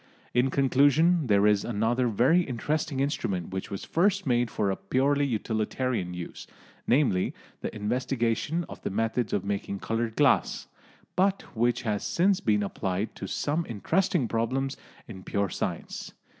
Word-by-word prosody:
In 125 +2 +3
conclusion, 145 +5 +3
there 100 -2 +4
is 105 -1 +4
another 120 +3 +1
very 125 - +4
interesting 145 0 -2
instrument 100 - -1
which 95 0 -4
was 100 - -5
first 185 +4 +2
made 120 -3 +2
for 100 -2 0
a - - -1
purely 135 +9 +1
utilitarian 110 -3 -1
use 90 -1 -7 0.4
namely, 120 -8 +2 0.2
the - - -5
investigation 125 +8 -1
of - - -10
the - - -2
methods 115 +3 -1
of 100 - -1
making 100 0 -2
coloured 115 +2 -2
glass 145 -2 +2 0.5
but 195 +2 +2
which 120 +2 +1
has 105 -4 -1
since 185 +2 +2
been 105 -2 +1
applied 95 +1 -2
to - - -6
some 155 +4 -1
interesting 160 - +1
problems 130 +5 -1 0.3
in 95 -5 -9
pure 100 +1 -1
science. - - -4
120 Hz, 145 wpm, -27 LUFS, 105-140 Hz, 0.5 s, there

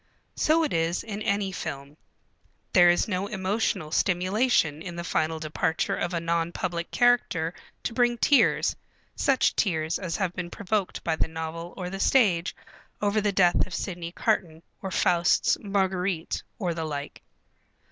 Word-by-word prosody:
So 320 +1 +3
it 305 - -1
is 165 +1 0
in 215 -2 -6
any 200 -2 0
film. 140 -5 -6 0.8
There 175 -1 +7
is 175 - +3
no 195 -1 -1
emotional 190 -4 -1
stimulation 185 - +2
in 175 0 -7
the 170 - -4
final 160 -1 0
departure 155 +1 -1
of 175 - -2
a 170 - -1
non 170 0 -1
public 170 -1 -3
character 240 -9 +2 0.3
to - - -3
bring 240 0 +2
tears, 285 +4 +3 0.4
such 270 -4 +2
tears 160 -5 0
as 175 -3 -3
have 190 -4 -1
been 180 -1 -5
provoked 205 +1 -2
by 165 - 0
the - - +1
novel 160 +1 -6
or 180 -2 -4
the 195 - -5
stage 195 -9 +3 0.4
over 210 +1 +1
the 205 0 +1
death 180 -3 +3
of 185 - -6
Sidney 175 -3 -4
Carton 175 -6 -1 0.2
or 195 - -4
Faust's 175 -2 +3
Marguerite 190 -4 -1 0.2
or 180 -6 -1
the 165 -1 -3
like. 145 -1 -5
180 Hz, 155 wpm, -26 LUFS, 165-205 Hz, 0.8 s, There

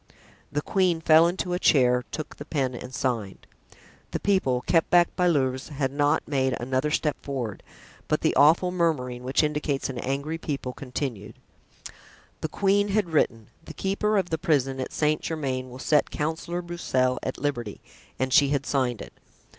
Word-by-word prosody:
The 145 0 -2
queen 185 -4 +1
fell 160 +1 +6
into 180 0 -2
a 180 - 0
chair, 125 -7 +4
took 155 -1 -6
the 145 - -8
pen 135 -5 -1
and 125 +1 -8
signed. 115 -7 -3 0.6
The - - -3
people, 160 -11 +1
kept 165 +4 +2
back 175 0 +4
by 180 - +2
Louvieres, 130 -5 +1
had 140 -3 -2
not 145 +2 +1
made 130 -3 +1
another 130 +4 -1
step 150 0 0
forward; 125 -8 -4 0.5
but - - 0
the - - +1
awful 165 +5 +5
murmuring, 145 -9 -1
which 130 +4 +1
indicates 150 -2 -1
an 125 - -6
angry 140 +6 -3
people, 140 -5 -4
continued. 125 -6 -5 1.0
The 155 - -3
queen 200 +4 +2
had 200 -3 0
written, 115 -7 0
"The - - -10
keeper 210 +2 0
of 185 -3 -1
the 160 - 0
prison 135 -6 +1
at 130 - -4
Saint 150 0 +1
Germain 130 -5 -3
will 125 - -10
set 150 +3 +2
Councillor 165 +3 -3
Broussel 130 -7 0
at 130 - -4
liberty;" 120 -8 -3 0.4
and 130 0 -1
she 145 -3 +6
had 140 -1 0
signed 125 -4 0
it. - - -13
145 Hz, 170 wpm, -26 LUFS, 130-165 Hz, 1.0 s, fell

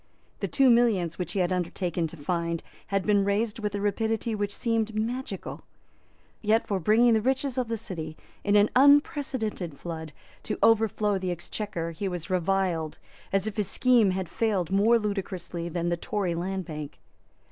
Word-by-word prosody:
The - - -1
two 270 -2 +4
millions 210 -9 +2
which 180 - -3
he 195 - +1
had 180 +1 +1
undertaken 175 -1 -1
to 170 - -11
find 170 +2 -2 0.2
had 195 -1 0
been 205 -2 +3
raised 210 +3 0
with 210 -2 -2
a - - -1
rapidity 220 +2 0
which 205 -1 -1
seemed 225 0 -1
magical. 240 +5 -3 0.8
Yet 220 +1 +2
for 200 -2 -1
bringing 225 +6 +4
the 220 - +3
riches 265 +2 0
of 255 -2 0
the 230 0 -2
City, 160 -7 -6 0.3
in 205 0 +2
an 205 +1 +5
unprecedented 260 - +3
flood, 160 -2 -6 0.3
to - - -3
overflow 215 -2 +3
the 185 -1 -2
Exchequer 175 -1 -4
he 180 +5 -4
was 180 0 -5
reviled 180 -3 0 0.3
as 195 0 +1
if 220 -1 -4
his 210 -3 0
scheme 245 -5 +4
had 185 -1 -2
failed 190 -2 -1
more 210 +5 +5
ludicrously 190 -5 -3
than 170 +1 -1
the 175 - 0
Tory 185 0 -2
Land 185 +2 -3
Bank. 150 -3 -7
200 Hz, 170 wpm, -27 LUFS, 175-225 Hz, 0.8 s, an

